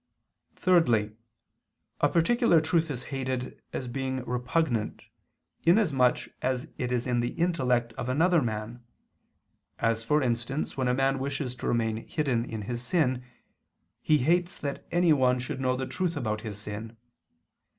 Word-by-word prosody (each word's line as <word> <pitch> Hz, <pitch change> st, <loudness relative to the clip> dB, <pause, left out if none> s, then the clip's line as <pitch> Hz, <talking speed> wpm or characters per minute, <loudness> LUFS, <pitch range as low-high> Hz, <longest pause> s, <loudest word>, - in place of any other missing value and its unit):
Thirdly, 120 Hz, -, +3 dB, 0.8 s
a -, -, +4 dB
particular 175 Hz, +2 st, +4 dB
truth 160 Hz, +1 st, +1 dB
is 125 Hz, -4 st, -4 dB
hated, 130 Hz, -1 st, -3 dB
as 130 Hz, -, -4 dB
being 130 Hz, 0 st, -3 dB
repugnant, 125 Hz, -1 st, -1 dB, 0.6 s
inasmuch 155 Hz, -, +4 dB, 0.2 s
as 130 Hz, 0 st, -1 dB
it 125 Hz, -1 st, -1 dB
is 125 Hz, -1 st, 0 dB
in 125 Hz, -2 st, +1 dB
the 120 Hz, 0 st, -1 dB
intellect 125 Hz, -9 st, +1 dB
of 125 Hz, -, -3 dB
another 165 Hz, +5 st, +3 dB
man: 115 Hz, 0 st, -4 dB, 0.9 s
as, 115 Hz, -1 st, 0 dB
for 150 Hz, +5 st, +2 dB
instance, 120 Hz, +4 st, -1 dB
when 130 Hz, -2 st, 0 dB
a 125 Hz, -, +2 dB
man 135 Hz, 0 st, +1 dB
wishes 135 Hz, -1 st, -2 dB
to 125 Hz, -, -6 dB
remain 115 Hz, -2 st, +1 dB
hidden 130 Hz, -7 st, 0 dB
in 110 Hz, -3 st, -5 dB
his 120 Hz, +3 st, -4 dB
sin, 130 Hz, -2 st, +1 dB, 0.8 s
he 155 Hz, -, +4 dB
hates 175 Hz, +7 st, +1 dB
that 140 Hz, -1 st, -5 dB
anyone 150 Hz, -8 st, +4 dB
should 130 Hz, +2 st, -4 dB
know 130 Hz, -1 st, +1 dB
the 130 Hz, +1 st, -2 dB
truth 175 Hz, +2 st, -2 dB
about 110 Hz, -5 st, -2 dB
his 105 Hz, -3 st, -6 dB
sin. 105 Hz, +2 st, -7 dB
130 Hz, 145 wpm, -28 LUFS, 120-150 Hz, 0.9 s, a